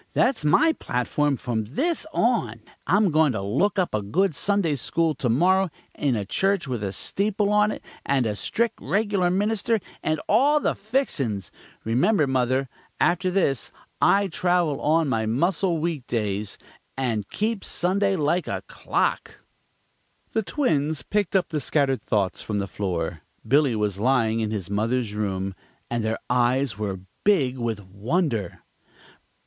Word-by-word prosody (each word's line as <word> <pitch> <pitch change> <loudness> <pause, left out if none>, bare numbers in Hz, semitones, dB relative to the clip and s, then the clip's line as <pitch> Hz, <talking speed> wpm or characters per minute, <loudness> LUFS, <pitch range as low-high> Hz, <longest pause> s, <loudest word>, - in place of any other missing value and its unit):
That's 255 - +2
my 315 - +4
platform 140 - -1
from 115 -3 -2
this 310 - -1
on. 125 - 0 0.3
I'm 200 0 +3
goin' 155 -3 +3
to 100 - -2
look 140 - +1
up 185 -2 0
a 105 - 0
good 170 - +1
Sunday 200 -1 +1
school 160 +4 0
to 125 - -2
morrow, 185 +9 +3 0.2
in 140 -4 0
a 105 -2 -2
church 190 - 0
with 120 -5 -3
a 100 - -2
steeple 200 - 0
on 210 0 +4
it, - - -5 0.2
and 135 -3 +1
a 105 -2 -1
strict, 230 - -1
regular 200 -3 +1
minister, 210 +4 +1 0.2
and 155 0 0
all 280 +8 +4
the - - 0
fixin's. 145 - -1 0.3
Remember, 145 - +2
mother, 130 0 +1 0.3
after 180 +2 +2
this 155 - 0 0.3
I 200 0 +4
travel 175 -4 0
on 155 +1 +2
my 110 -4 0
muscle 170 - +1
weekdays, 115 -11 -2 0.4
and 115 -6 -1
keep 215 -1 -2
Sunday 195 +3 +1
like 170 +2 0
a - - -3
clock!" - - -1 1.0
The 220 - +1
twins 155 - 0
picked 205 +2 -1
up 190 - +2
the 155 -2 -1
scattered 135 -1 +1
thoughts 100 -4 -1
from 105 - -3
the 100 -1 -1
floor 85 -5 -3 0.3
Billy 140 -1 +3
was 105 -2 -1
lying 115 -2 +2
in 110 -1 -1
his 105 -5 -3
mother's 110 +2 -1
room 95 -2 -2 0.4
and 120 -1 -1
their 110 0 -1
eyes 125 0 +2
were 100 -3 -4 0.2
big 135 -11 +2
with 115 -4 -3
wonder. 110 - -2
140 Hz, 150 wpm, -24 LUFS, -, 1.0 s, my